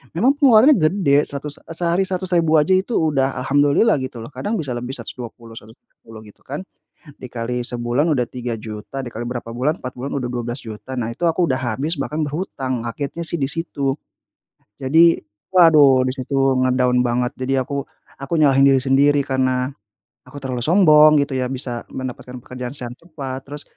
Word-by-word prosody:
Memang 255 +11 +3
pengeluarannya 270 +1 +6
gede, 155 -3 +2
seratus 145 +1 -5
e - - -13
sehari 175 +2 +1
Rp100.000 180 -4 +1
aja 150 +5 +1
itu 190 +5 -1
udah 135 -4 0
Alhamdulillah 145 +10 +3
gitu 130 -2 -6
loh 115 - -7
kadang 210 0 -3
bisa 145 -5 -4
lebih 120 +1 -5
Rp120.000, 115 -1 -9
Rp110.00 110 0 -15
gitu 105 - -18
kan, 145 +3 -6 0.6
dikali 125 0 -4
sebulan 120 +5 -1
udah 125 -5 +1
Rp3.000.000 115 0 -6
dikali 120 -1 -6
berapa 125 -1 -5
bulan 140 +7 0
4 125 - -6
bulan 135 +3 -5
udah 130 - -3
Rp12.000.000, 120 0 -6
nah 115 -1 -2
itu 120 - -23
aku 175 +2 +1
udah 130 0 0
habis 135 +7 -2
bahkan 150 +3 -3
berhutang, 140 - -3
kagetnya 145 +7 -5
sih 170 - -2
di - - +2
situ. 140 -3 -2 0.9
Jadi, 160 +5 +4 0.3
waduh 150 -7 +6
di - - -1
situ 135 +1 -4 0.2
nge-down 125 -1 +2
banget, 125 +2 0
jadi 130 +1 0
aku 140 +1 -4 0.4
aku 135 +2 -8
nyalahin 135 -2 +5
diri 135 -1 +4
sendiri 140 +2 +3
karena 130 -1 0 0.6
aku 145 - -11
terlalu 130 -2 -4
sombong 155 -4 +6
gitu 140 -1 -3
ya 130 -1 -1
bisa 125 -2 -4
mendapatkan 125 -1 -7
pekerjaan 125 0 -7
secara 120 -1 -6
cepat, 140 -6 -7
terus 145 +1 -7
135 Hz, 165 wpm, -20 LUFS, 125-155 Hz, 0.9 s, pengeluarannya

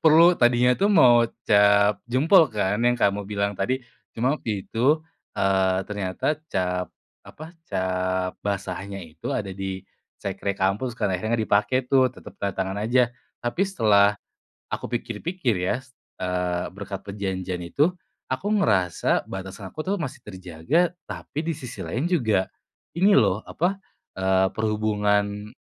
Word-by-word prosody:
Perlu, 165 +3 +7
tadinya 120 +1 +4
tuh 200 - +3
mau 120 - +6 0.2
cap 100 -1 +5
jempol 155 +8 +5
kan 105 -1 -1
yang 120 0 +4
kamu 100 -4 0
bilang 100 0 -1
tadi, 130 +6 -1 0.3
cuma 125 +5 +1
waktu 105 -4 -3
itu, 140 +7 +2 0.3
eee, 95 -1 +2
ternyata 105 +8 -2
cap 90 - -1 0.4
apa, 155 +2 -10 0.2
cap 95 -1 -1
basahnya 100 0 -4
itu 80 -1 -6
ada 100 -5 -3
di 95 0 -5 0.4
sekre 100 0 -2
kampus 100 +6 -1
kan, 105 -4 -1
akhirnya 110 +5 -1
nggak 110 - 0
dipakai 105 +5 +2
tuh 130 -1 +5
tetep - - -13
tanda 100 -2 -2
tangan 95 +1 -2
aja. 120 +3 +2 0.3
Tapi 120 +11 0
setelah 105 - +4 0.6
aku - - -3
pikir-pikir 120 - -2
ya, 90 +7 0 0.5
eee, 90 -1 -1
berkat 100 0 -7
perjanjian 95 -2 -4
itu, 140 - +1 0.4
aku 130 +10 -3
ngerasa 100 - +1
batasan 95 0 -7
aku 155 +10 -6
tuh 200 +2 0
masih 140 -3 -4
terjaga 95 - 0 0.2
tapi 150 +3 -5
di 165 - 0
sisi 125 -5 -9
lain 125 - -2
juga 110 - +1 0.5
ini 195 +4 +4
loh 100 - +3
apa, 180 +4 -1 0.4
eee, 95 0 +2
perhubungan 105 -1 0
105 Hz, 140 wpm, -24 LUFS, 95-125 Hz, 0.6 s, Perlu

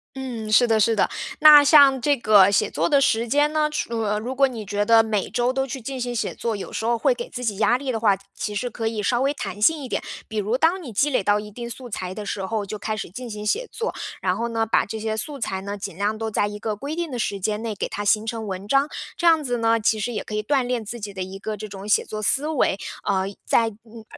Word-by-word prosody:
嗯， 240 -5 -5
是 245 +3 +6
的 225 -2 +2
是 225 +1 +3
的， - - +3 0.3
那 300 -1 +9
像 280 -3 +6
这 285 +1 +2
个 205 -4 +6
写 200 - +2
作 - - 0
的 285 -3 +5
时 235 -3 +2
间 290 +5 +2
呢， 305 -1 +2
除 235 -6 -2
呃， 210 -1 0
如 250 +5 -4
果 275 0 +4
你 230 -5 -7
觉 205 +1 -1
得 225 +1 +5
每 215 -3 -1
周 245 +1 0
都 270 0 -1
去 265 - -5
进 260 +2 -6
行 245 0 -3
写 230 - -2
作， 230 -2 -3
有 195 - -7
时 - - -3
候 235 +1 +1
会 - - +2
给 485 0 -7
自 250 0 -5
己 205 -3 -1
压 225 +3 +3
力 265 0 -3
的 225 - -2
话， 205 -3 +3 0.2
其 210 -1 -4
实 245 +2 -2
可 225 0 -3
以 220 -2 -2
稍 240 +3 +1
微 275 +1 +2
弹 205 -2 -6
性 305 +4 +3
一 - - -5
点。 - - -2 0.3
比 220 - -6
如 215 +5 0
当 350 +5 +2
你 265 - -8
积 285 +8 +1
累 230 - +1
到 205 +1 +3
一 210 0 -9
定 235 +2 -7
素 250 +1 -8
材 185 -2 -4
的 210 - -6
时 195 -1 -3
候 215 +1 -2
就 210 +2 -6
开 215 +1 -3
始 - - -4
进 245 +4 -7
行 210 -1 -6
写 475 - 0
作， 470 - -3 0.3
然 185 -1 0
后 235 +2 -2
呢 225 -1 -1
把 225 - +2
这 220 +1 -6
些 220 0 -2
素 280 +7 -4
材 190 -4 -3
呢， 200 +1 -5
尽 195 -3 -6
量 205 +3 -1
都 220 0 -3
在 205 - +1
一 205 0 -6
个 215 0 -3
规 280 +9 -5
定 340 -4 -3
的 245 - -4
时 200 -2 -2
间 210 +2 -2
内 225 -2 -4
给 - - -3
它 205 - -5
形 210 +1 +2
成 225 -1 -4
文 190 +1 -5
章。 275 +5 +2 0.3
这 345 - 0
样 320 -2 +5
子 245 -2 -1
呢， 230 0 +2
其 215 0 +1
实 240 +4 -2
也 210 - -3
可 215 - -9
以 210 - 0
锻 265 +5 +1
炼 245 -2 -2
自 235 +3 -7
己 205 -1 -6
的 190 - -6
一 190 +1 -6
个 215 +2 -4
这 215 +1 -7
种 195 0 -9
写 210 - +3
作 215 - -6
思 270 +8 0
维， 295 -10 +1 0.3
呃， 190 -2 0 0.2
在 230 -1 +3
嗯， 225 +1 -14
225 Hz, 310 characters per minute, -23 LUFS, 210-255 Hz, 0.3 s, 那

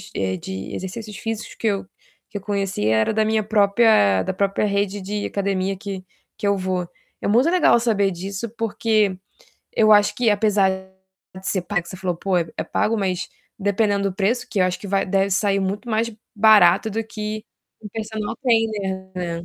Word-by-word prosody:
eh, 95 -1 -1
de 95 +2 -6
exercícios 210 +3 -6
físicos 225 -1 -5
que 225 - -2
eu 200 -2 0 0.4
que 215 - -5
eu - - -6
conhecia 195 - 0
era 110 - +2
da 220 0 +2
minha 220 0 +1
própria 200 - +4
da - - -2
própria 195 +2 0
rede 200 0 -1
de 205 +2 -3
academia 195 -1 -1
que 195 -1 -6 0.3
que 210 - -2
eu 200 0 +2
vou. 185 -2 -2 0.3
É - - -2
muito 240 +9 +4
legal 350 -9 +4
saber 215 -4 +2
disso, 195 +5 -5
porque 215 -3 +1 0.6
eu 215 -1 +5
acho 205 -1 +5
que 240 -3 +2
apesar 205 -2 +3 0.7
de 190 - -10
ser 190 - 0
pag 180 +1 -1
que 170 - -14
você 185 - -7
falou: 180 -2 -2
"Pô, 185 +1 0
é 165 -2 -3
pago", 225 +1 0
mas 185 -3 -1 0.3
dependendo 200 0 +1
do - - -9
preço, 220 +5 0
que 195 - -1
eu - - +5
acho 180 0 -1
que 200 - -9
vai 195 0 +1
deve 195 +1 +1
sair 195 +1 +2
muito 200 +5 -3
mais 225 +1 0 0.2
barato 210 -2 +6
do 225 +2 -2
que 215 0 -5 0.4
um 210 - -7
personal 215 0 -4
trainer, 210 -6 0
né? 170 -2 -4
200 Hz, 190 wpm, -22 LUFS, 190-215 Hz, 0.7 s, barato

